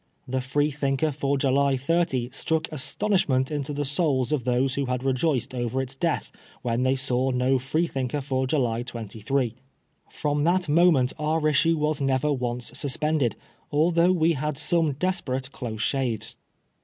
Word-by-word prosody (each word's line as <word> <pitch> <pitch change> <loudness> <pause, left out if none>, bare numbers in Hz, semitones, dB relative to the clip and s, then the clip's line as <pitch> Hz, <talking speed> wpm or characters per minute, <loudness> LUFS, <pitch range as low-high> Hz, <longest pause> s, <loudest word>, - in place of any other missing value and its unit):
The 130 +1 -1
Freethinker 145 +2 0
for 140 0 -1
July 135 0 +2
30 135 -4 0
struck 160 +4 -1
astonishment 150 -3 0
into 145 -1 -2
the 145 0 -2
souls 140 -3 0
of 140 -6 0
those 130 +1 +1
who 140 0 -1
had 125 0 -2
rejoiced 135 0 0
over 120 +1 -2
its 130 0 -3
death 165 +5 -1 0.3
when 120 -1 0
they 130 +1 +2
saw 130 0 0
no 130 +1 +2
Freethinker 135 -1 -1
for 130 -1 -1
July 120 -5 0
23. 115 +1 -3 0.6
From 145 -1 -1
that 175 +2 +2
moment 150 -5 +4
our 155 +1 +1
issue 160 +2 +3
was 150 -1 0
never 135 +2 +1
once 125 -2 -2
suspended, 145 -3 0 0.4
although 170 +4 +3
we 165 -2 +3
had 150 0 -3
some 155 0 +2
desperate 135 -5 -2
close 110 -5 -5
shaves. 130 -6 -1
135 Hz, 150 wpm, -25 LUFS, 130-155 Hz, 0.6 s, moment